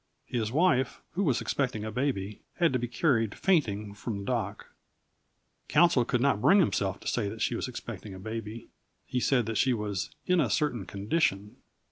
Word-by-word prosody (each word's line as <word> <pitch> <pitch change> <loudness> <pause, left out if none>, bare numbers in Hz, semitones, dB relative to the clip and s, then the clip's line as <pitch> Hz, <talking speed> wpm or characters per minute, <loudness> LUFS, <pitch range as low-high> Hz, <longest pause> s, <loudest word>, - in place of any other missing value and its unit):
His 115 -3 -2
wife, 135 -4 +2
who 195 - -1
was 140 - +1
expecting 125 -6 -1
a 110 - -4
baby, 105 -5 -2
had 170 -5 +2
to 130 - +1
be 120 - -2
carried 115 -3 +1
fainting 110 - +1
from 105 +1 -5
the 100 - -6
dock. - - -3 0.9
Counsel 150 -6 +4
could 125 0 0
not 125 -6 +2
bring 200 - +6
himself 100 - +1
to - - -8
say 105 -4 0
that - - -4
she - - +1
was - - -2
expecting 100 -3 -7
a - - -9
baby. 110 +2 -6 0.4
He 125 - -1
said 125 -2 +2
that 115 0 -2
she 130 -1 +3
was 105 -3 -3 0.2
"in 180 -2 +3
a 130 - +1
certain 125 - 0
condition." 100 - -1
115 Hz, 185 wpm, -29 LUFS, 105-140 Hz, 0.9 s, bring